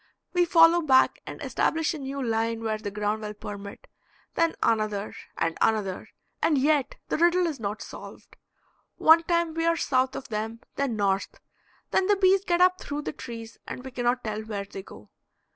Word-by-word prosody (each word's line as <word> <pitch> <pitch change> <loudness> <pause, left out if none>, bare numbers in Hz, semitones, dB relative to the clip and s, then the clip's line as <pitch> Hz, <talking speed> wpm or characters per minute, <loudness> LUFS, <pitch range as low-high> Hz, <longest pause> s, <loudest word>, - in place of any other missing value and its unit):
We 355 -1 +3
follow 335 0 +6
back 265 -5 +4
and - - -7
establish 320 +1 0
a 315 - -6
new 275 0 -4
line 225 -1 -1
where 215 -1 -1
the 210 - -4
ground 210 +1 -2
will 210 0 -6
permit; 200 -1 -8 0.5
then 330 -1 +1
another 215 -2 0 0.2
and 165 -1 0
another, 205 -4 0 0.3
and 305 - +3
yet 285 0 +2
the - - -1
riddle 345 +1 +4
is 315 -6 -3
not 210 -1 -4
solved. - - -11 0.6
One 325 +1 +6
time 340 -1 0
we 330 0 -1
are 335 0 +3
south 260 -3 +1
of - - -7
them, 220 +1 -4
then 275 -4 -1
north, 195 -2 -1 0.5
then 375 - +2
the 410 - +4
bees 385 0 +4
get 350 -2 +1
up 365 0 +4
through 290 +1 -4
the - - -4
trees 230 -2 -9
and 250 - -7
we 265 - -7
cannot 245 0 0
tell 215 -1 -3
where 210 -2 -5
they 195 - -8
go. 105 - -14
255 Hz, 185 wpm, -26 LUFS, 215-330 Hz, 0.6 s, follow